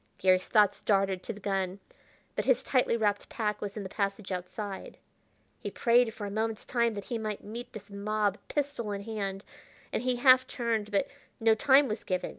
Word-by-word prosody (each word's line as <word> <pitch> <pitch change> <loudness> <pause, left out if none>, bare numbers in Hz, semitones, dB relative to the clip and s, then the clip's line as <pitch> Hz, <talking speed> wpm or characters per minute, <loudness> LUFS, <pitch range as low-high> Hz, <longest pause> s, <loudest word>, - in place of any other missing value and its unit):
Garry's 185 0 +3
thoughts 210 -3 +4
darted 195 -2 +2
to - - -5
the 210 - -9
gun, 195 -1 -1 0.6
but - - -1
his - - +3
tightly 250 -3 +2
wrapped 205 -2 0
pack 215 -4 -2
was 205 0 -5
in 205 - -3
the - - -4
passage 200 0 -2
outside. 190 +2 -5 0.6
He - - -4
prayed 240 -1 +3
for 215 -2 -6
a 200 - -4
moment's 220 +1 -2
time 235 -2 +1
that 200 - -5
he 235 - -3
might 215 -2 -4
meet 230 +4 -7
this 205 -1 -10
mob 205 0 0
pistol 280 -8 -2
in 200 0 -4
hand, 200 -3 -4 0.5
and - - 0
he 250 0 +1
half 255 +1 +6
turned; 225 -4 -1
but 205 +6 +1 0.3
no 225 -1 +5
time 265 +5 +5
was 215 -1 -4
given. 185 -1 -1
210 Hz, 195 wpm, -30 LUFS, 200-235 Hz, 0.6 s, half